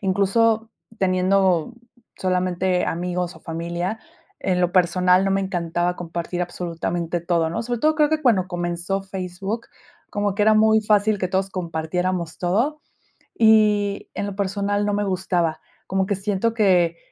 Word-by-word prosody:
Incluso 215 +4 +2 0.3
teniendo 185 +1 +2 0.4
solamente 185 0 0
amigos, 180 +1 -2
o, - - -16
familia, 170 +5 -4 0.4
en 180 -1 0
lo 180 0 +1
personal 180 +1 +3
no 195 - +1
me 195 - +2
encantaba 175 -2 -1
compartir 175 +1 -4
absolutamente 175 -1 -3
todo, 170 -1 0
¿no? 225 +7 -2
Sobre 240 0 -3
todo 310 0 +3
creo 300 -1 +4
que 315 0 0
cuando 210 -9 +3
comenzó 175 +2 -2
Facebook 190 +3 -5 0.4
como 205 -1 -1
que 205 - +1
era 215 +1 +5
muy 220 0 +5
fácil 210 0 +2
que 185 -1 -1
todos 190 +1 -1
compartiéramos 175 0 -3
todo 230 - 0 0.6
y 210 -2 +3
en - - -3
lo 200 - -6
personal 200 +1 -1
no 205 - 0
me 205 0 0
gustaba. 180 -4 -1 0.3
Como 190 0 0
que 200 - -1
siento 205 +3 -1
que 180 -6 +3
190 Hz, 150 wpm, -22 LUFS, 175-205 Hz, 0.6 s, era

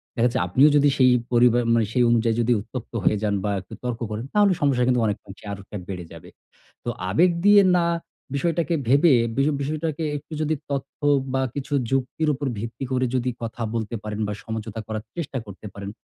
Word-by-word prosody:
দেখাচ্ছে 120 0 +2
আপনিও 130 +11 +5
যদি 145 0 +5
সেই 130 -1 +6 0.2
পরিবার 120 0 +5
মানে 115 -1 +3
সেই 125 - +3
অনুযায়ী 115 -1 +2
যদি 120 +1 +1
উত্তপ্ত 120 +3 -8
হয়ে 105 - +3
যান 105 -1 +1
বা 105 - 0
একটু 90 - -14
তর্ক 125 -2 -3
করেন 110 +3 -4
তাহলে 205 -2 +4
সমস্যা 135 -4 +2
কিন্তু 125 -1 +3
অনেক 105 -2 0
আংশে 100 +2 -12
আরো 100 +1 -10
বেড়ে 90 -3 -5
যাবে। - - -12 0.5
তো - - -3 0.2
আবেগ 175 - +4
দিয়ে 205 0 +8 0.2
না 170 - +2 0.5
বিষয়টাকে 170 +3 0
ভেবে, 140 +4 +5 0.2
বিষ 135 +1 +2
বিষয়টাকে 155 +2 -2
একটু 150 +3 -11
যদি 155 +1 +1 0.2
তথ্য 140 -1 -4 0.3
বা 135 - +1
কিছু 140 0 -4 0.2
যুক্তির 135 +4 0
উপর 140 +1 -3
ভিত্তি 115 +4 -6
করে 130 0 +1
যদি 125 0 0
কথা 115 +1 -5
বলতে 115 0 -3
পারেন 105 0 -5
বা 105 - -2
সমঝোতা 110 -1 -5
করার 110 -1 -4
চেষ্টা 150 -6 -4
করতে 100 +1 -11
পারেন, 100 0 -7
125 Hz, 190 wpm, -24 LUFS, 110-145 Hz, 0.5 s, দিয়ে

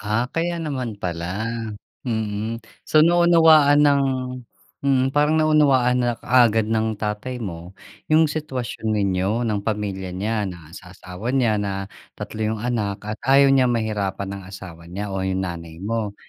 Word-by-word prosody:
Ah, 110 +3 0
kaya 170 +1 -1
naman 130 -8 -4
pala, 90 +4 -3 0.6
mm. 110 0 -2 0.3
So 155 - +5
naunawaan 165 -4 +5
ng 140 -1 +4 0.8
mm, 135 -2 +2
parang 150 +2 +3
naunawaan 140 -5 +3
na 120 -1 +1
kaagad 115 -4 +3
ng 110 0 0
tatay 105 +4 -3
mo 85 -1 -7 0.4
yung 160 +1 +5
sitwasyon 130 -7 -3
ninyo 100 +3 0
ng 105 -2 -1
pamilya 100 -3 -3
niya 105 +3 -1
na 85 -4 -9
sa 90 -2 -11
asawa 90 +7 -6
niya 115 -5 +2
na 100 -1 -3 0.3
3 110 - -7
yung 110 - -7
anak 110 -5 -2
at 105 0 -4
ayaw 135 +1 +6
niya 130 -1 +4
mahirapan 105 -4 -2
ng 95 - -11
asawa 90 -3 -10
niya 100 +3 -5
o 95 - -2
yung 95 0 -1
nanay 85 -2 -6
mo. 105 -1 -2
110 Hz, 150 wpm, -22 LUFS, 95-130 Hz, 0.8 s, ayaw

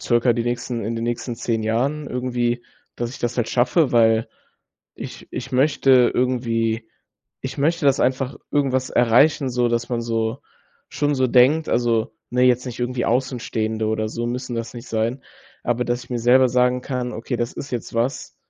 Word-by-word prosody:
circa 120 0 +2
die 115 - -1
nächsten 120 -1 -3
in 115 - -2
den 115 - -3
nächsten 120 0 -3
10 115 -1 -1
Jahren 135 +7 -1
irgendwie, 120 -1 -1 0.3
dass 120 -1 -3
ich 130 - -9
das 120 -1 -2
halt 120 -2 0
schaffe, 130 +6 +2
weil 115 -1 +4 0.7
ich - - -9
ich 135 - -6
möchte 130 -2 +4
irgendwie 115 -3 0 0.6
ich - - -5
möchte 160 +2 +1
das 135 - +3
einfach 130 0 0 0.2
irgendwas 130 -3 +1
erreichen, 130 +4 +4
so 125 -1 +1
dass 120 0 -1
man 120 -2 -1
so 115 +1 -1 0.5
schon 145 -1 0
so 130 -1 +2
denkt, 130 +6 +4
also 115 -2 +1 0.2
ne, 125 0 +2
jetzt 125 0 +3
nicht 125 -1 -7
irgendwie 120 0 -1
Außenstehende 115 -3 -1
oder 110 0 -1
so 120 +1 -3
müssen 125 +1 -4
das 115 0 -4
nicht 120 +1 -9
sein. 115 +4 -1 0.4
Aber 120 +1 0
dass 120 0 -2
ich - - -20
mir 120 - -1
selber 125 +2 +5
sagen 125 0 +2
kann, 125 -2 -3
okay, 120 +2 -4
das 120 +1 -2
ist 140 - -7
jetzt 120 -2 -4
was. 120 +4 -2
120 Hz, 180 wpm, -22 LUFS, 115-130 Hz, 0.7 s, selber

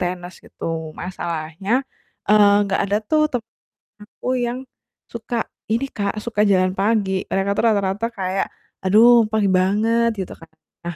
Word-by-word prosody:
tenis, 180 0 -4
gitu. 160 -1 -5
Masalahnya, 170 +1 -4 0.6
eee, 205 -1 +6
nggak 195 - 0
ada 200 +1 0
tuh 310 -1 +3
temen 230 -3 -4 0.5
aku 220 - -11 0.2
yang 240 +2 -3 0.5
suka 235 +1 -4 0.3
ini 235 +5 +1
Kak, 200 -1 -2
suka 230 -3 0
jalan 185 -2 +3
pagi, 205 -1 +1 0.2
mereka 195 +1 0
tuh - - +1
rata-rata 200 +1 0
kayak, 190 -3 -2 0.4
"Aduh, 225 +4 +6
pagi 215 -2 +2
banget," 215 +5 +2
gitu 190 - -4
kan. 165 - -15 0.4
Nah, 175 -1 -5
200 Hz, 140 wpm, -21 LUFS, 185-225 Hz, 0.6 s, eee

